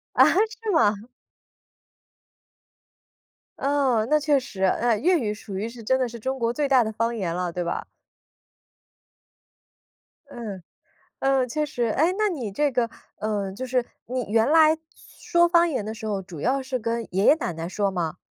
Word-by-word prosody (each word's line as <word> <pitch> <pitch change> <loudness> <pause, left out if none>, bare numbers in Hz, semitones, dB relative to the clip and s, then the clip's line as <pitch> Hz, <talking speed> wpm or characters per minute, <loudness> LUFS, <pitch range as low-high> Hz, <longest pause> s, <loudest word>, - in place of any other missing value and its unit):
啊， - - +7
是 440 +2 0
吗？ 220 - +4 2.6
嗯， 270 -6 +1
那 305 - +4
确 295 -1 +2
实。 195 -6 -8
呃， 230 +4 +2
粤 350 - +3
语 210 -5 -1
属 205 -2 -8
于 215 +4 -2
是 230 -1 -11
真 260 +4 +2
的 255 -2 0
是 235 0 -9
中 265 +4 -3
国 235 -1 0
最 290 +1 -1
大 260 -3 +5
的 220 - -2
方 230 +2 -1
言 180 -6 -2
了， 180 -1 -2
对 180 - -3
吧？ 170 - -3 2.4
嗯， 210 -8 -7 0.6
嗯， 270 -1 +2
确 305 +3 -1
实。 245 -4 -3
哎， 310 +10 +2
那 425 -1 +2
你 250 - -4
这 290 +7 +1
个， 240 -2 0 0.3
呃， 205 -3 -2
就 255 +6 -5
是 250 -1 0 0.2
你 250 -1 -3
原 225 +4 +3
来 315 0 +6 0.5
说 345 -1 +4
方 340 0 +4
言 255 -9 -2
的 220 - -4
时 220 0 -8
候， 200 -2 -2
主 180 -5 -10
要 270 +2 +1
是 260 -1 -3
跟 230 +1 -2
爷 195 - +2
爷 - - +8
奶 240 - -3
奶 165 +1 -5
说 200 +1 0
吗？ 170 -4 -3
240 Hz, 185 characters per minute, -24 LUFS, 210-285 Hz, 2.6 s, 爷